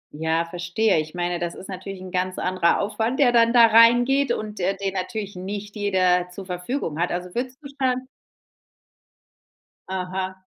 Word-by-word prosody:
Ja, 160 +2 0
verstehe. 175 +3 0
Ich 155 +2 -5
meine, 175 0 -1
das 170 0 -3
ist 190 - -10
natürlich 190 0 -7
'n 185 0 -9
ganz 185 0 -1
anderer 185 -2 +1
Aufwand, 220 +6 -1
der 265 -4 +5
dann 230 -1 +4
da 235 -1 +7
reingeht 240 +4 +5
und, 215 -2 -4
äh, 190 +2 0
den 195 -1 -2
natürlich 200 +2 -4
nicht 205 +3 -6
jeder 185 -3 +2
zur 190 +2 -9
Verfügung 180 - -4
hat. 175 - +1
Also, 180 0 -4
würdest 255 +1 -3
du - - -7
schon 255 0 0 1.8
Aha. 185 0 -4
190 Hz, 165 wpm, -23 LUFS, 180-230 Hz, 1.8 s, da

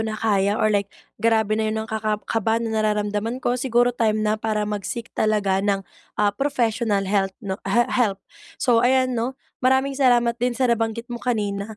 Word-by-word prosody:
na 220 -1 -2
kaya 205 -1 +1
or 215 0 +2
like 200 -1 0 0.3
grabe 220 -2 +2
na 220 - 0
’yon 220 0 -2
ang - - -14
ka 220 - -1
ka 215 0 0
kaba 225 0 0
na 225 -1 -1
nararamdaman 210 +2 -1
ko, 245 -1 -1
siguro 245 -1 +2
time 215 -2 0
na 215 0 0
para 215 -1 -1
mag-seek 210 +3 -5
talaga 205 -3 +1
ng, 195 -1 0 0.3
ah, 205 -1 +2
professional 230 -5 0
health 195 -1 0
'no 190 0 -4
he 240 0 +3
help. 225 -6 +2 0.4
So, 235 -3 +3
ayan, 255 +1 +3
‘no, 245 +3 -2 0.3
maraming 265 +2 +2
salamat 240 -3 +3
din 245 -1 0
sa 255 - +2
nabanggit 230 0 -1
mo 240 -1 -6
kanina. 210 -3 -2
220 Hz, 190 wpm, -23 LUFS, 210-240 Hz, 0.4 s, he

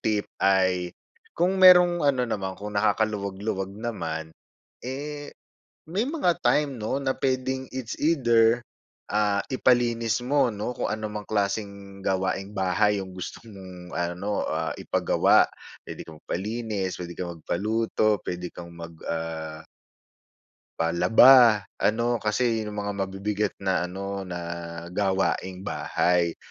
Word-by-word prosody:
tip 105 -2 0 0.2
ay, 95 -2 +2 0.4
kung 185 +2 +2
mayro'ng 180 -1 +8
ano 135 -3 +3
naman, 95 -5 -3
kung 105 +1 -7
nakakaluwag-luwag 100 -2 0
naman, 85 -9 -4 0.5
eh, 145 +3 -5 0.6
may 195 +7 0
mga 285 - +1
time, 145 -2 +2
'no, 110 +5 -1
na 130 -1 0
puwedeng 130 0 -1
it's 130 -3 -5
either, 120 -6 +3 0.5
ah, 105 -1 +2
ipalinis 120 -3 +2
mo, 140 0 +2
'no, 105 +4 -4
kung - - -2
ano 110 0 -3
mang 105 0 -6
klaseng 100 -1 -2
gawaing-bahay 95 +1 0
'yong 95 -1 -6
gusto 90 - -6
mong 95 -4 -11
ano, 90 +4 -2
ah, 80 0 -2
ipagawa. - - +3 0.4
Puwede - - -7
kang 80 -1 -11
magpalinis, 105 -1 -3
puwede 85 -1 -6
kang 90 -1 -4
magpaluto, 110 +4 0
pwede 90 0 -4
kang 85 -1 -9
mag 85 0 -9
ah 80 -1 -4 1.2
Palaba 105 +7 +6 0.2
ano, 115 +2 +1
kasi 115 +2 +1
yun 110 - -4
ang - - -1
mga 100 - -2
mabibigat 100 +2 -2
na 90 -2 +1
ano 100 +1 -5
na 90 -1 -4 0.5
gawaing 95 -1 -1
bahay. 85 -1 0
105 Hz, 125 wpm, -26 LUFS, 95-120 Hz, 1.2 s, mayro'ng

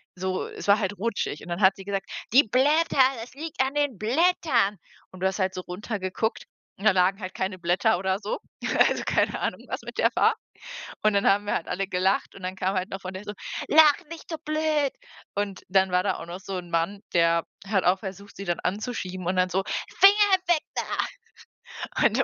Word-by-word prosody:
so 185 0 -2
es - - -8
war 200 +1 +6
halt 205 0 -2
rutschig, 210 -7 -2
und 175 - -11
dann 175 +4 -3
hat 190 0 +6
sie 195 - -11
gesagt: 195 -1 -3 0.3
„Die 275 - +8
Blätter, 285 +8 +2 0.2
das 240 - -10
liegt 305 -1 -4
an 265 +2 -2
den 290 -7 0
Blättern.“ 245 - +2 0.3
Und 185 -1 -13
du 190 - +3
hast 190 +1 -3
halt 190 0 +1
so 185 - -3
runtergeguckt, 200 +3 -3 0.3
und 200 - -8
da 215 - +7
lagen 190 +2 +2
halt 185 -1 -6
keine 190 0 -3
Blätter 180 +5 +2
oder 190 +1 -1
so. 210 - -3 0.5
Also - - -2
keine - - +1
Ahnung, - - -2
was - - -4
mit - - -9
der - - +4
war. - - +4 0.7
Und 215 -1 +4
dann 200 - +2
haben 205 +1 +2
wir - - -1
halt 165 - -3
alle 195 +1 -2
gelacht, 190 +1 0
und 195 - -12
dann 185 +1 -3
kam 190 +1 -1
halt 185 +2 -1
noch 195 0 -6
von 185 0 -6
der 190 +2 -7
so: 210 - -6 0.3
„Lacht 300 -1 +5
nicht 335 0 -10
so 320 - -3
blöd!“ 305 -2 +1 0.4
Und 200 -2 -3
dann 190 -1 +3
war 180 0 +2
da 190 -3 0
auch - - -7
noch 175 +2 -7
so 195 -1 -5
'n 175 -1 -7
Mann 170 +5 0
der 170 -1 +3 0.2
hat 195 -2 +1
auch 185 +2 +3
versucht, 200 0 -9
sie 200 - -7
dann 175 -1 -1
anzuschieben 185 -3 -3
und 185 - 0
dann 185 0 +3
so: 190 +2 0 0.4
„Finger 400 -1 +7
weg 335 -3 +3
da!" - - 0 1.2
Und - - +1
195 Hz, 215 wpm, -26 LUFS, 185-235 Hz, 1.2 s, Die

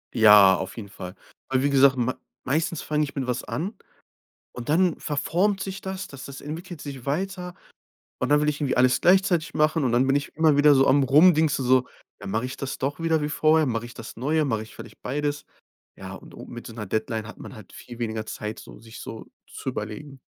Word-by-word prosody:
Ja, 105 -4 +8
auf 95 +3 -6
jeden 100 -4 -7
Fall. 90 -1 -9 0.3
Aber 130 0 +1
wie 145 - +2
gesagt, 135 -1 +5
ma 125 +1 0 0.3
meistens 160 +4 -1
fang 150 0 0
ich 145 - -3
mit 135 -2 -2
was 125 -1 -2
an, 190 +8 -4 0.8
und 125 -1 -8
dann 170 +2 +2
verformt 180 +7 0
sich 195 0 -5
das, 190 0 -5
das 140 -2 -10
das 135 -1 -9
entwickelt 165 +2 -7
sich 140 -3 -8
weiter. 180 +4 -3 0.6
Und - - -1
dann 145 0 +5
will 150 - +1
ich 150 0 -1
irgendwie 140 -3 0
alles 125 +1 +4
gleichzeitig 180 -3 +3
machen, 155 -1 +2
und 120 - +1
dann 125 +2 +3
bin 135 +1 +3
ich 140 - -3
immer 155 -2 +4
wieder 145 0 +6
so 135 0 +4
am 140 +1 +4
Rumdingsen 150 0 +4
so: 130 0 +3 0.3
„Ja, - - -9
mache 110 +5 -1
ich 130 - -7
das 135 -1 -5
doch 140 +2 -2
wieder 165 -2 +1
wie 150 - -1
vorher, 155 0 +3
mache 115 -1 -2
ich 120 - -12
das 115 - -9
Neue, 150 +6 +1
mache 110 -6 -1
ich 110 - -13
vielleicht - - -12
beides?” 145 +2 -2 0.5
Ja, - - -8
und - - -13
o - - -9
mit 120 -1 -9
so - - -8
'ner 110 -2 -6
Deadline 110 +2 -2
hat - - -11
man - - -10
halt 110 -3 -13
viel 120 -1 -11
weniger 110 -2 -3
Zeit, 105 +1 -6
so, - - -12
sich 115 0 -12
so 110 - -8 0.2
zu - - -7
überlegen. 135 +4 -6
140 Hz, 225 wpm, -25 LUFS, 120-155 Hz, 0.8 s, Ja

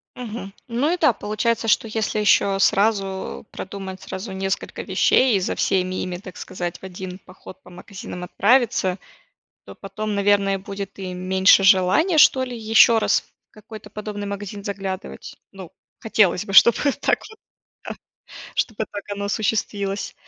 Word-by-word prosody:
Мгм. 225 -5 -7
Ну 250 +6 0
и 360 - -1
да, 305 -7 +3
получается, 220 +2 -2
что 225 - +2
если 215 -1 -2
ещё 200 -2 +3
сразу 195 -1 0
продумать 190 -1 -7
сразу 190 +2 -7
несколько 190 0 -3
вещей 255 -5 +3
и - - +2
за 185 - -2
всеми 185 -1 0
ими, 180 -1 -4
так 185 -1 -11
сказать, 175 -2 -5
в - - -30
один 185 0 -8
поход 185 0 -14
по - - -15
магазинам 180 0 -9
отправиться, 205 -1 +2 0.7
то - - -11
потом, 215 +1 -5
наверное, 200 -1 +2
будет 200 0 -7
и 185 -1 -5
меньше 190 +2 +4
желания, 195 - +4
что 265 -3 +6
ли, 250 -2 -6
ещё 225 +1 +5
раз - - +2 0.3
в - - -64
какой-то 215 -1 -12
подобный 210 -1 -6
магазин 200 0 -6
заглядывать. 195 - -6 0.2
Ну, 190 -3 -11 0.3
хотелось 205 -3 +2
бы, 195 - -7
чтобы 235 +4 +7 0.2
так - - +2
вот, 440 -1 -16 0.5
да, - - -5 0.6
чтобы 220 -1 -1
так 205 - -6
оно 200 0 -4
осуществилось. 200 -1 -2
200 Hz, 155 wpm, -22 LUFS, 190-220 Hz, 0.7 s, чтобы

